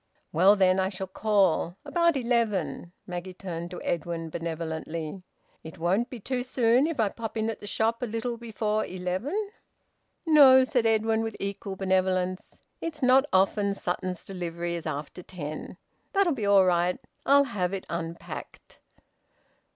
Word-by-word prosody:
"Well, 190 Hz, +6 st, +6 dB
then, 190 Hz, -1 st, +3 dB
I 190 Hz, 0 st, +1 dB
shall 190 Hz, -1 st, -5 dB
call. 190 Hz, -3 st, +1 dB
About 335 Hz, +1 st, +2 dB
eleven." 210 Hz, -, 0 dB
Maggie 180 Hz, 0 st, -6 dB
turned 170 Hz, -3 st, -5 dB
to 180 Hz, -, -8 dB
Edwin 165 Hz, -1 st, -3 dB
benevolently. 165 Hz, +1 st, -4 dB, 0.4 s
"It 160 Hz, +3 st, -10 dB
won't 185 Hz, +8 st, +1 dB
be 250 Hz, -, -7 dB
too 250 Hz, +4 st, -2 dB
soon 250 Hz, +2 st, +3 dB
if 325 Hz, -6 st, -4 dB
I 215 Hz, -3 st, +3 dB
pop 225 Hz, +1 st, -6 dB
in 220 Hz, +1 st, 0 dB
at 220 Hz, -, -8 dB
the 205 Hz, -, -9 dB
shop 225 Hz, +3 st, 0 dB
a 245 Hz, -, -1 dB
little 230 Hz, +2 st, -3 dB
before 215 Hz, -2 st, -2 dB
eleven?" 205 Hz, -, -3 dB, 0.7 s
"No," 275 Hz, -5 st, +8 dB
said 245 Hz, -3 st, +1 dB
Edwin 220 Hz, 0 st, +2 dB
with 225 Hz, -1 st, -4 dB
equal 200 Hz, 0 st, -4 dB
benevolence. 185 Hz, -1 st, 0 dB, 0.2 s
"It's 305 Hz, -4 st, -5 dB
not 260 Hz, +2 st, +6 dB
often 200 Hz, +1 st, +2 dB
Sutton's 180 Hz, 0 st, -3 dB
delivery 175 Hz, -2 st, -4 dB
is 170 Hz, -1 st, -4 dB
after 145 Hz, +5 st, -5 dB
ten. 155 Hz, -4 st, -7 dB, 0.4 s
That'll 390 Hz, -4 st, +3 dB
be 220 Hz, -6 st, -2 dB
all 200 Hz, -2 st, +6 dB
right. 180 Hz, 0 st, +2 dB, 0.3 s
I'll 280 Hz, +1 st, +7 dB
have 200 Hz, -9 st, -2 dB
it 195 Hz, -1 st, -4 dB
unpacked." 165 Hz, 0 st, -7 dB
195 Hz, 150 wpm, -27 LUFS, 175-235 Hz, 0.7 s, No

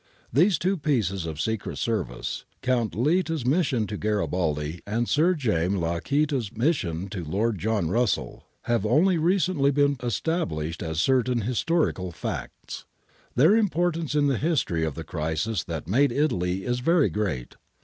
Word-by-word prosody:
These 175 Hz, -, +4 dB
two 190 Hz, +5 st, 0 dB
pieces 105 Hz, -, 0 dB
of 80 Hz, -2 st, -6 dB
secret 110 Hz, +5 st, -2 dB
service, 95 Hz, -, -2 dB, 0.2 s
Count 120 Hz, -4 st, 0 dB
Litta's 160 Hz, -, +1 dB
mission 135 Hz, -5 st, +2 dB
to 105 Hz, 0 st, -5 dB
Garibaldi, 90 Hz, -7 st, -1 dB
and 115 Hz, +3 st, 0 dB
Sir 170 Hz, +5 st, +3 dB
James 100 Hz, -, 0 dB
Lacaita's 115 Hz, -, 0 dB
mission 100 Hz, -, 0 dB
to 95 Hz, -4 st, -5 dB
Lord 100 Hz, +6 st, -1 dB
John 105 Hz, -4 st, 0 dB
Russell, 110 Hz, -, 0 dB, 0.2 s
have 120 Hz, -4 st, 0 dB
only 160 Hz, -, +3 dB
re 170 Hz, +4 st, +3 dB
cently 150 Hz, -6 st, +2 dB
been 145 Hz, 0 st, +2 dB
established 95 Hz, -, -2 dB
as 80 Hz, -1 st, -3 dB
certain 125 Hz, +3 st, +2 dB
historical 125 Hz, -, 0 dB
facts. -, -, -6 dB, 0.5 s
Their 155 Hz, -, +6 dB
importance 175 Hz, -7 st, 0 dB
in 145 Hz, -1 st, +3 dB
the 135 Hz, -4 st, +1 dB
history 135 Hz, -, 0 dB
of 80 Hz, -3 st, -2 dB
the 80 Hz, -, -5 dB
crisis 80 Hz, +7 st, -2 dB
that 80 Hz, -2 st, -5 dB
made 135 Hz, +9 st, +3 dB
Italy 95 Hz, -, 0 dB
is 125 Hz, 0 st, 0 dB
very 165 Hz, +4 st, +3 dB
great. 85 Hz, -, -3 dB
115 Hz, 150 wpm, -26 LUFS, 90-150 Hz, 0.5 s, Their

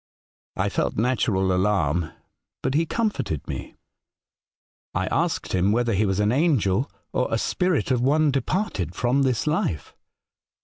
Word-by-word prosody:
I -, -, +1 dB
felt -, -, -1 dB
natural 105 Hz, -5 st, +1 dB
alarm, 90 Hz, -5 st, +1 dB, 0.5 s
but 130 Hz, -, 0 dB
he 160 Hz, +3 st, +2 dB
comforted 210 Hz, -, -2 dB
me. -, -, -6 dB, 1.2 s
I -, -, +1 dB
asked -, -, -1 dB
him 95 Hz, +2 st, +2 dB
whether 120 Hz, +1 st, +1 dB
he 105 Hz, +2 st, +2 dB
was 95 Hz, 0 st, 0 dB
an 105 Hz, +1 st, +2 dB
angel, 130 Hz, -, +2 dB, 0.2 s
or 125 Hz, -, +1 dB
a 115 Hz, -, +1 dB
spirit 180 Hz, +3 st, 0 dB
of 125 Hz, -2 st, +2 dB
one 150 Hz, +3 st, +3 dB
departed 130 Hz, -, -2 dB
from 125 Hz, +3 st, +1 dB
this 130 Hz, -4 st, +1 dB
life. 150 Hz, -, -1 dB
120 Hz, 140 wpm, -24 LUFS, 95-140 Hz, 1.2 s, one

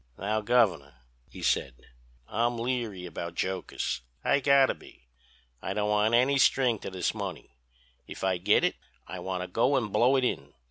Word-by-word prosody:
"'Now, 105 Hz, +3 st, -1 dB
Governor,' 105 Hz, -, +2 dB, 0.3 s
he -, -, -10 dB
said, 65 Hz, -, +1 dB, 0.5 s
'I'm 120 Hz, +1 st, 0 dB
leery 115 Hz, -6 st, -3 dB
about 85 Hz, -1 st, -6 dB
jokers—I 65 Hz, -, -2 dB
gotta 140 Hz, -1 st, +4 dB
be. 65 Hz, -, -18 dB, 0.5 s
I 95 Hz, -, -4 dB
don't 105 Hz, 0 st, 0 dB
want 105 Hz, +2 st, +3 dB
any 135 Hz, +3 st, +3 dB
string 125 Hz, -3 st, +3 dB
to -, -, -6 dB
this 95 Hz, -2 st, -2 dB
money. -, -, -7 dB, 0.5 s
If -, -, -9 dB
I 95 Hz, -2 st, +1 dB
git 105 Hz, +4 st, +3 dB
it -, -, +1 dB, 0.3 s
I 95 Hz, -, -7 dB
want 90 Hz, 0 st, -3 dB
to -, -, -6 dB
go 120 Hz, +9 st, +2 dB
and 115 Hz, -6 st, -1 dB
blow 120 Hz, +5 st, +4 dB
it 130 Hz, -, +2 dB
in. 70 Hz, -, -2 dB
105 Hz, 170 wpm, -28 LUFS, 90-120 Hz, 0.5 s, gotta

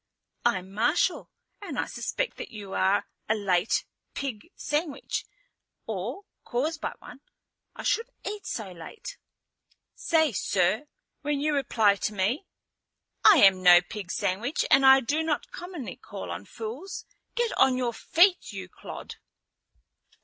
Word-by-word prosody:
"I'm 190 Hz, -6 st, 0 dB
Marshal, 240 Hz, -, +1 dB, 0.3 s
and -, -, -6 dB
I -, -, +1 dB
suspect -, -, -3 dB
that -, -, -6 dB
you 205 Hz, -3 st, -8 dB
are 195 Hz, +2 st, +2 dB, 0.2 s
a 220 Hz, -, +4 dB
late 195 Hz, -2 st, +1 dB, 0.3 s
pig 275 Hz, +1 st, -5 dB
sandwich, 295 Hz, -1 st, -2 dB, 0.6 s
or 225 Hz, -, -4 dB, 0.2 s
caused 300 Hz, +6 st, -2 dB
by -, -, -2 dB
one. 250 Hz, -, -12 dB, 0.6 s
I -, -, -7 dB
shouldn't 460 Hz, -, -1 dB
eat 410 Hz, -1 st, -5 dB
so 210 Hz, -5 st, -4 dB
late." 180 Hz, -, -9 dB, 0.7 s
"Say 315 Hz, -3 st, +2 dB
'sir' 200 Hz, +6 st, +1 dB, 0.3 s
when 290 Hz, -1 st, -1 dB
you 300 Hz, +1 st, +1 dB
reply 225 Hz, -7 st, +3 dB
to 210 Hz, +2 st, -2 dB
me. 220 Hz, -, 0 dB, 0.8 s
I 400 Hz, -8 st, +8 dB
am 190 Hz, -1 st, +7 dB
no 175 Hz, -1 st, +9 dB
pig 180 Hz, +1 st, -8 dB
sandwich 215 Hz, +11 st, -1 dB
and 270 Hz, -, +7 dB
I 265 Hz, 0 st, +8 dB
do 290 Hz, +6 st, 0 dB
not 320 Hz, -2 st, -2 dB
commonly 345 Hz, -, -7 dB
call 90 Hz, -2 st, -7 dB
on 90 Hz, +3 st, -6 dB
fools. 235 Hz, -, -7 dB, 0.3 s
Get 475 Hz, -1 st, 0 dB
on 260 Hz, -1 st, +5 dB
your 245 Hz, -2 st, -1 dB
feet, 355 Hz, -, +3 dB
you 190 Hz, -2 st, -7 dB
clod." -, -, -9 dB
240 Hz, 140 wpm, -27 LUFS, 195-310 Hz, 0.8 s, no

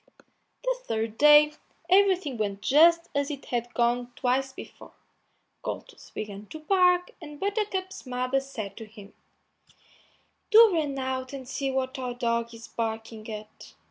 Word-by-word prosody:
The -, -, +1 dB
third 225 Hz, 0 st, -2 dB
day 300 Hz, 0 st, +7 dB, 0.3 s
everything 370 Hz, -6 st, +3 dB
went 205 Hz, -2 st, -3 dB
just 335 Hz, +6 st, +5 dB
as 280 Hz, -1 st, 0 dB
it 285 Hz, -2 st, -6 dB
had 240 Hz, 0 st, -3 dB
gone 240 Hz, +1 st, +1 dB
twice 265 Hz, +2 st, 0 dB
before; -, -, -12 dB, 0.7 s
Goldtooth -, -, -7 dB
began 205 Hz, -1 st, -6 dB
to 315 Hz, -, -9 dB
bark, 360 Hz, +1 st, +3 dB
and 295 Hz, -2 st, -10 dB
Buttercup's 390 Hz, -, -3 dB
mother 255 Hz, +1 st, 0 dB
said 245 Hz, -7 st, -7 dB
to 225 Hz, -, -7 dB
him, 205 Hz, -2 st, -14 dB, 1.4 s
"Do 445 Hz, -2 st, +8 dB
run 295 Hz, -4 st, -1 dB
out 260 Hz, 0 st, -3 dB
and 265 Hz, -2 st, -7 dB
see 275 Hz, +1 st, -2 dB
what 265 Hz, 0 st, -2 dB
our 250 Hz, -1 st, -4 dB
dog 235 Hz, -1 st, -1 dB
is 230 Hz, 0 st, -11 dB
barking 225 Hz, -1 st, -5 dB
at." 215 Hz, 0 st, -10 dB
260 Hz, 140 wpm, -27 LUFS, 230-310 Hz, 1.4 s, Do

